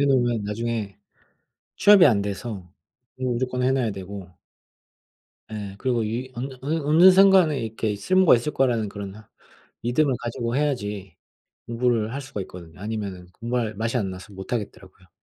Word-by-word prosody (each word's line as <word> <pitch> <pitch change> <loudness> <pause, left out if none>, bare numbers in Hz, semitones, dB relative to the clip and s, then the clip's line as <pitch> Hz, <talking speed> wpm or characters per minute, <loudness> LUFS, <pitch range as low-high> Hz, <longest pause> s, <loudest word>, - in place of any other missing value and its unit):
해 140 - +4
놓으면 120 -5 +2
나중에 105 -1 -3 0.8
취업이 200 -4 +7
안 110 -7 +4
돼서 100 -2 -5 0.5
공부를 130 -1 -1
무조건 125 +1 -2
해 130 - +3
놔야 130 -5 0
되고 95 -1 -8 1.2
예. 100 -2 -6
그리고 120 -2 0
유의 120 +4 -4
언 130 +3 -4
어느 145 +4 -2
어느 165 +6 +7
순간에 185 -5 +5
이렇게 110 -2 -2
쓸모가 185 - +4
있을 150 +6 -3
거라는 120 -6 +1
그런 100 -1 -7 0.7
믿음을 130 +4 +2
가지고 120 +1 -3
해야지 105 - -2 0.5
공부를 115 -1 0
할 140 - -4
수가 135 -6 -6
있거든요. 85 -2 -12
아니면은 100 -4 -5
공부할 115 -2 -2
맛이 115 +4 -2
안 100 -5 -1
나서 95 +3 -10
못 95 +4 -8
하겠더라고요. 95 -5 -6
115 Hz, 350 characters per minute, -24 LUFS, 100-130 Hz, 1.2 s, 취업이